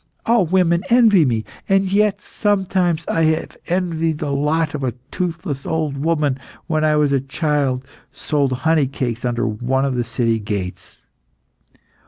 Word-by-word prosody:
All 230 -6 +3
women 170 -1 +2
envy 225 -8 +5
me, 115 -4 0 0.2
and 195 -1 +2
yet 205 0 +2
sometimes 190 -5 0
I 165 - +1
have 160 0 0
envied 165 -3 0
the 150 -2 -3
lot 150 +3 0
of 145 -2 -4
a 125 -3 -1 0.2
toothless 160 -6 -3
old 155 -3 -1
woman 150 -2 0
who, - - -22 0.2
when 155 -1 0
I 155 -1 +3
was 150 -2 +2
a 135 -2 +2
child, 135 -2 -1 0.3
sold 140 -1 -1
honey 160 -4 +3
cakes 125 -3 -3
under 120 0 0
one 125 +5 0
of 135 - 0
the 120 -1 0
city 115 -1 0
gates. 100 -4 -5
150 Hz, 160 wpm, -20 LUFS, 130-170 Hz, 0.3 s, envy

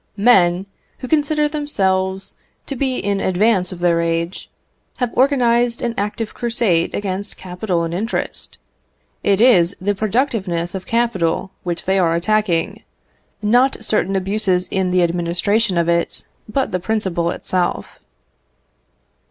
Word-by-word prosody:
Men, 190 -5 +4 0.3
who 255 - -7
consider 300 +1 +2
themselves 190 -11 -1 0.3
to 275 - -5
be 260 0 -1
in 200 0 -1
advance 190 0 +1
of 180 -1 -8
their 170 -1 +3
age, 170 +2 -2 0.5
have 245 -3 -2
organised 245 -3 +2
an 235 -1 -1
active 210 +2 -3
crusade 230 -8 +1
against 200 0 -4
capital 180 -1 -2
and 165 0 -3
interest; 215 +7 -3 0.7
it 200 -1 +2
is 200 -7 +5
the 205 +2 0
productiveness 200 -5 -1
of 190 -1 -6
capital 195 -6 0
which 175 -1 -4
they 190 +1 +2
are 165 -2 +2
attacking; 180 -2 0 0.6
not 245 +2 +2
certain 195 -3 +1
abuses 190 -1 0
in 190 -1 0
the 180 0 +3
administration 175 +4 0
of 170 -1 +1
it, 170 0 0 0.2
but 265 +4 -1
the 180 - -1
principle 185 -4 -1
itself. 180 0 -2
195 Hz, 130 wpm, -19 LUFS, 175-230 Hz, 0.7 s, is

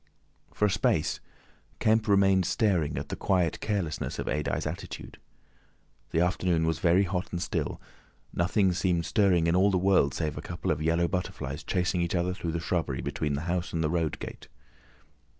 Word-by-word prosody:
For 105 - +1
a - - +3
space 105 - +1 0.6
Kemp 110 0 +2
remained 95 -2 +4
staring 85 -10 +1
at - - -4
the - - -3
quiet 90 -4 +1
carelessness 95 -8 -2
of - - -3
Adye's 75 -1 -1
attitude. - - -6 0.9
The 80 - +1
afternoon 90 -2 +1
was 80 0 0
very 90 +2 +4
hot 90 -1 -3
and 85 - -2
still, - - -2 0.5
nothing 95 +2 +2
seemed 90 -2 0
stirring 95 -6 +3
in 85 +1 +2
all 95 +2 +5
the 95 - +2
world 90 -6 +3
save 75 -4 -2
a - - -6
couple 85 - -3
of 75 0 -1
yellow 85 +2 +2
butterflies 90 +1 -4
chasing 90 -1 0
each 85 +1 -1
other 90 +1 0
through 85 -4 -4
the 85 - -1
shrubbery 80 -6 -1
between 75 -2 -2
the 70 - -3
house 85 +1 -2
and 80 -1 0
the 75 - 0
road 85 -3 0
gate. - - -8
90 Hz, 180 wpm, -28 LUFS, 80-95 Hz, 0.9 s, all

